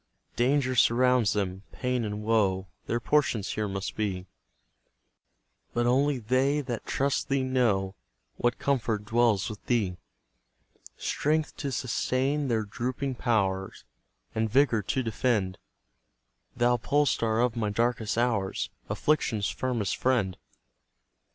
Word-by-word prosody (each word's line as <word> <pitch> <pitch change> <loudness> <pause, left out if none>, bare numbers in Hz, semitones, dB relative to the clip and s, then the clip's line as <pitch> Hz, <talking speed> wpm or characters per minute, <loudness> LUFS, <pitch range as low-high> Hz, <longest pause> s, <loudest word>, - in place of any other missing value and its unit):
Danger 130 +1 +2
surrounds 125 -1 +4
them, 95 -2 -2
pain 125 -2 -1
and 105 0 -4
woe 100 -4 +2 0.2
Their 120 - 0
portion 135 -4 +1
here 105 +1 -2
must 95 0 -4
be, 95 -4 -2 1.5
But 120 0 +2
only 135 +3 +3
they 130 +5 +1
that 125 -5 -5
trust 140 +1 0
thee 135 -1 +1
know 115 -8 +1 0.4
What 120 - +1
comfort 115 -6 0
dwells 115 -3 +2
with 110 -3 -7
thee; 105 -7 +1 1.0
Strength 155 +1 0
to 140 -2 -3
sustain 135 +3 0
their 115 -3 +1
drooping 125 +6 -3
pow'rs, 95 -6 -1 0.5
And 110 0 0
vigour 120 -2 +3
to 130 +6 -1
defend, 110 -5 0 1.0
Thou 120 0 +3
pole 145 +5 +2
star 115 -4 +1
of 120 -1 +2
my 110 -3 -1
darkest 115 0 0
hours 110 -5 0 0.2
Affliction's 115 -9 +1
firmest 120 -7 -1
friend! 115 -8 +1
120 Hz, 120 wpm, -28 LUFS, 105-130 Hz, 1.5 s, surrounds